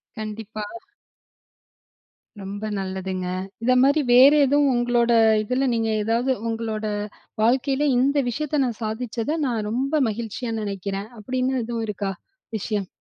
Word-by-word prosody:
கண்டிப்பா. 215 Hz, 0 st, -6 dB, 1.8 s
ரொம்ப 200 Hz, +2 st, -6 dB, 0.2 s
நல்லதுங்க. 190 Hz, -1 st, -3 dB, 0.4 s
இந்த 255 Hz, +2 st, +4 dB
மாரி 285 Hz, +3 st, +4 dB
வேற 260 Hz, +3 st, +9 dB
எதுவும் 285 Hz, 0 st, +3 dB
உங்களோட 240 Hz, -1 st, +2 dB, 0.3 s
இதுல, 255 Hz, +5 st, 0 dB
நீங்க 225 Hz, -1 st, 0 dB
ஏதாவது 230 Hz, +5 st, +1 dB, 0.2 s
உங்களோட 225 Hz, -1 st, -3 dB, 0.6 s
வாழ்க்கையில, 265 Hz, +4 st, +2 dB
இந்த 275 Hz, +4 st, +2 dB
விஷயத்தை 300 Hz, +4 st, -1 dB
நான் 235 Hz, -3 st, -4 dB
சாதிச்சத 235 Hz, +6 st, -2 dB
நான் 230 Hz, -5 st, -1 dB
ரொம்ப 275 Hz, +6 st, 0 dB
மகிழ்ச்சியா 230 Hz, +2 st, -4 dB
நினைக்கிறேன், 200 Hz, 0 st, -4 dB
அப்படின்னு 255 Hz, +4 st, -1 dB
எதுவும் 230 Hz, 0 st, -3 dB
இருக்கா? 200 Hz, -1 st, -3 dB, 0.5 s
விஷயம். 205 Hz, -2 st, -2 dB
230 Hz, 115 wpm, -23 LUFS, 210-255 Hz, 1.8 s, வேற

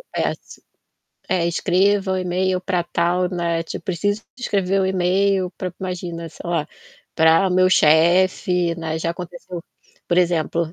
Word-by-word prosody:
eh, -, -, +1 dB
ass -, -, -7 dB, 0.7 s
é: 180 Hz, -3 st, +1 dB
"Escreva 190 Hz, +3 st, +1 dB
o -, -, 0 dB
e-mail 185 Hz, +1 st, 0 dB
pra 180 Hz, -2 st, -1 dB
tal", 180 Hz, +1 st, 0 dB
né, 170 Hz, -2 st, -1 dB
tipo: 165 Hz, -, -8 dB
"Preciso 205 Hz, +4 st, -1 dB
de 255 Hz, -, -13 dB
escrever 195 Hz, -2 st, +1 dB
o -, -, +1 dB
e-mail 190 Hz, 0 st, +1 dB
pra", 185 Hz, -2 st, -4 dB
imagina, 175 Hz, -3 st, -5 dB
sei 165 Hz, -, -10 dB
lá, 165 Hz, -3 st, -1 dB, 0.5 s
"pra 160 Hz, +4 st, +4 dB
meu 185 Hz, 0 st, +4 dB
chefe", 175 Hz, +2 st, +3 dB
né. 160 Hz, -1 st, -3 dB
Já 165 Hz, +1 st, -1 dB
aconteceu, 175 Hz, +1 st, -7 dB, 0.5 s
por 175 Hz, -, 0 dB
exemplo, 170 Hz, -2 st, 0 dB
180 Hz, 150 wpm, -21 LUFS, 170-185 Hz, 0.7 s, pra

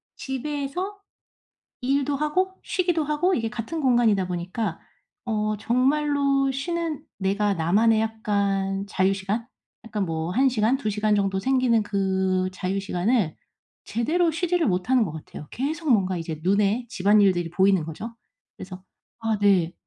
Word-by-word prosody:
집에서 290 Hz, +8 st, -4 dB, 0.9 s
일도 275 Hz, +2 st, +1 dB
하고 365 Hz, +6 st, 0 dB
쉬기도 350 Hz, -4 st, 0 dB
하고 300 Hz, +6 st, +1 dB
이게 225 Hz, -6 st, -1 dB
같은 240 Hz, +8 st, -5 dB
공간이다 235 Hz, -8 st, +3 dB
보니까 180 Hz, +2 st, -3 dB, 0.4 s
어 215 Hz, -2 st, -1 dB
정말로 275 Hz, +3 st, +2 dB
쉬는 325 Hz, +3 st, -3 dB
내가 200 Hz, +1 st, +1 dB
나만의 210 Hz, +7 st, +3 dB
약간 200 Hz, -3 st, -1 dB
자유 190 Hz, -1 st, +2 dB
시간? 200 Hz, +4 st, -3 dB, 0.4 s
약간 215 Hz, -3 st, -2 dB
뭐 160 Hz, 0 st, -3 dB
1 265 Hz, +6 st, +4 dB
시간, 240 Hz, 0 st, +2 dB
2 240 Hz, -6 st, -2 dB
시간 210 Hz, +1 st, +1 dB
정도 195 Hz, -1 st, +1 dB
생기는 255 Hz, -1 st, +2 dB
그 190 Hz, -2 st, 0 dB
자유 185 Hz, +1 st, -2 dB
시간을 195 Hz, -1 st, 0 dB, 0.5 s
제대로 325 Hz, +10 st, +1 dB
쉬지를 335 Hz, +1 st, 0 dB
못하는 220 Hz, +5 st, +2 dB
것 170 Hz, -, -5 dB
같아요. 155 Hz, -1 st, -9 dB
계속 310 Hz, +4 st, -2 dB
뭔가 190 Hz, -4 st, +2 dB
이제 160 Hz, -2 st, -5 dB
눈에 200 Hz, +6 st, +2 dB
집안일들이 195 Hz, -4 st, +3 dB
보이는 190 Hz, -1 st, +3 dB
거죠. 210 Hz, +9 st, -7 dB, 0.4 s
그래서 185 Hz, 0 st, -9 dB, 0.4 s
아 225 Hz, -1 st, 0 dB
네. 190 Hz, -5 st, +3 dB
215 Hz, 285 characters per minute, -24 LUFS, 190-270 Hz, 0.9 s, 1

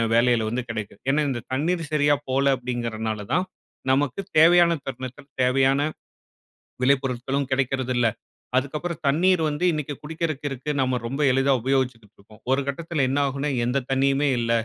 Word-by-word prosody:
வேளயில 120 Hz, -1 st, +3 dB
வந்து 125 Hz, +2 st, -2 dB
கெடைக்கும். 105 Hz, -3 st, -6 dB
ஏன்னா, 145 Hz, +3 st, +3 dB
இந்த 125 Hz, -3 st, -3 dB
தண்ணீர் 165 Hz, +3 st, -1 dB
சரியா 145 Hz, -1 st, +4 dB
போல 135 Hz, +1 st, +3 dB
அப்டிங்கிறனால 115 Hz, -3 st, -3 dB
தான் 180 Hz, +3 st, +2 dB, 0.5 s
நமக்கு 140 Hz, +5 st, 0 dB, 0.2 s
தேவையான 170 Hz, +1 st, +6 dB
தருணத்தில 130 Hz, +1 st, -7 dB, 0.2 s
தேவையான 135 Hz, +2 st, +3 dB, 1.0 s
விளைபொருட்களும் 135 Hz, 0 st, +1 dB
கெடைக்கறதில்ல. 130 Hz, -2 st, +1 dB, 0.5 s
அதுக்கப்புறம் 155 Hz, +6 st, -2 dB
தண்ணீர் 175 Hz, +5 st, +3 dB
வந்து 150 Hz, +4 st, -2 dB
இன்னைக்கி 150 Hz, -2 st, -3 dB
குடிக்கிறக்கு 155 Hz, -2 st, -3 dB
இருக்கு. 135 Hz, +2 st, -5 dB
நம்ம 130 Hz, -1 st, +1 dB
ரொம்ப 135 Hz, +5 st, -4 dB
எளிதா 135 Hz, +1 st, +3 dB
உபயோகிச்சுட்டுருக்கோம். 115 Hz, -5 st, -3 dB
ஒரு 135 Hz, -, +3 dB
கட்டத்தில 155 Hz, 0 st, -1 dB
என்ன 135 Hz, +2 st, 0 dB
ஆகும்ன்னா 140 Hz, +2 st, -2 dB, 0.2 s
எந்த 130 Hz, +3 st, 0 dB
தண்ணீயுமே 135 Hz, +2 st, +2 dB
இல்ல. 115 Hz, -1 st, -1 dB
135 Hz, 135 wpm, -24 LUFS, 125-150 Hz, 1.0 s, தேவையான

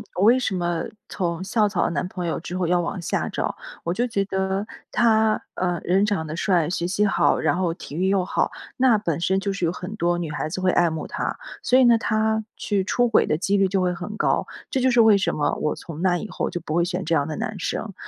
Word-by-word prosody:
我 185 Hz, -, +1 dB
为 240 Hz, +4 st, +6 dB
什 210 Hz, -6 st, -1 dB
么 175 Hz, -2 st, -1 dB, 0.2 s
从 175 Hz, -1 st, -2 dB
校 210 Hz, +1 st, +2 dB
草 185 Hz, -, 0 dB
男 180 Hz, -, -1 dB
朋 180 Hz, -1 st, -5 dB
友 165 Hz, -, -1 dB
之 180 Hz, +2 st, -5 dB
后 185 Hz, -, 0 dB
要 175 Hz, +1 st, +2 dB
往 175 Hz, +2 st, -3 dB
下 170 Hz, -, -2 dB
找。 -, -, -2 dB, 0.3 s
我 170 Hz, -, -1 dB
就 240 Hz, +5 st, 0 dB
觉 200 Hz, -4 st, -1 dB
得， 190 Hz, +1 st, -1 dB, 0.3 s
他， 220 Hz, -2 st, +3 dB
呃， 175 Hz, -2 st, -1 dB
人 190 Hz, +3 st, +2 dB
长 200 Hz, -7 st, -1 dB
得 155 Hz, +1 st, -5 dB
帅、 170 Hz, -4 st, +2 dB
学 175 Hz, -1 st, -1 dB
习 205 Hz, +3 st, +1 dB
好、 195 Hz, -, +3 dB
然 155 Hz, +1 st, +1 dB
后 180 Hz, -2 st, 0 dB
体 145 Hz, -, -9 dB
育 185 Hz, +3 st, +1 dB
又 195 Hz, -2 st, +2 dB
好， -, -, 0 dB, 0.3 s
那 250 Hz, -4 st, +5 dB
本 170 Hz, -6 st, -2 dB
身 190 Hz, +2 st, +2 dB
就 195 Hz, 0 st, -2 dB
是 195 Hz, -, -5 dB
有 165 Hz, -, +2 dB
很 180 Hz, +3 st, -7 dB
多 175 Hz, -3 st, +1 dB
女 165 Hz, -3 st, -3 dB
孩 155 Hz, +1 st, -3 dB
子 185 Hz, -, -4 dB
会 185 Hz, 0 st, +2 dB
爱 175 Hz, -1 st, +3 dB
慕 160 Hz, -1 st, -4 dB
他。 -, -, -3 dB, 0.2 s
所 255 Hz, -, +3 dB
以 260 Hz, -, +6 dB
呢 235 Hz, -2 st, +5 dB
他 220 Hz, 0 st, +1 dB
去 200 Hz, -2 st, -1 dB
出 245 Hz, +5 st, +2 dB
轨 230 Hz, -, +3 dB
的 150 Hz, -, +1 dB
几 200 Hz, +3 st, 0 dB
率 195 Hz, -1 st, +3 dB
就 195 Hz, 0 st, 0 dB
会 180 Hz, -1 st, +1 dB
很 185 Hz, +5 st, -6 dB
高， -, -, +1 dB, 0.2 s
这 260 Hz, -, 0 dB
就 260 Hz, -, +4 dB
是 240 Hz, -1 st, +3 dB
为 220 Hz, -2 st, +6 dB
什 -, -, 0 dB
么 145 Hz, -, 0 dB
我 150 Hz, -, 0 dB
从 165 Hz, -1 st, -8 dB
那 180 Hz, -1 st, +2 dB
以 215 Hz, -, -5 dB
后 -, -, -2 dB
就 175 Hz, -, -4 dB
不 155 Hz, -, -5 dB
会 170 Hz, -, +3 dB
选 180 Hz, +1 st, -3 dB
这 165 Hz, -, 0 dB
样 145 Hz, -3 st, +2 dB
的 155 Hz, -, -4 dB
男 215 Hz, -2 st, -4 dB
生。 200 Hz, +3 st, -3 dB
185 Hz, 280 characters per minute, -23 LUFS, 170-210 Hz, 0.3 s, 为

